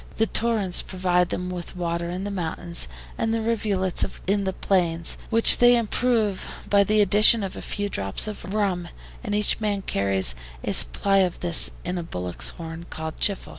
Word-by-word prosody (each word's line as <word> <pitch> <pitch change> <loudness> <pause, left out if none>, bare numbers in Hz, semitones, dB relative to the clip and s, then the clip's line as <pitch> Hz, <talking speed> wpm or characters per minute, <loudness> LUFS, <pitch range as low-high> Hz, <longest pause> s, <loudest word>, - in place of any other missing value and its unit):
The 225 - +2
torrents 220 -5 +1
provide 180 -1 0
them 180 0 -4
with 180 0 -7
water 170 -1 -3
in 180 +2 -5
the 205 - -4
mountains, 170 -2 -3 0.3
and 225 - 0
the 225 - 0
rivulets 205 -5 -1 0.2
in 200 +1 0
the 190 - -2
plains, 170 -4 0
which 230 0 +8
they 245 0 +6
improve 225 -3 -1 0.2
by 200 0 +4
the 215 +2 +2
addition 210 +2 +5
of 195 - -5
a - - -8
few 205 0 -4
drops 95 - -1
of 200 -3 -7
rum, 195 -4 -1 0.4
and 205 -3 -3
each 210 0 +1
man 205 -3 -2
carries 100 - +1 0.3
a - - -2
supply 65 - +1
of 185 -2 -1
this 170 -2 +4 0.2
in 180 0 -3
a - - -5
bullock's 90 - -4
horn, 165 0 -9
called 160 0 -7
CHIFFLE. 200 -2 0
190 Hz, 180 wpm, -23 LUFS, 170-210 Hz, 0.4 s, which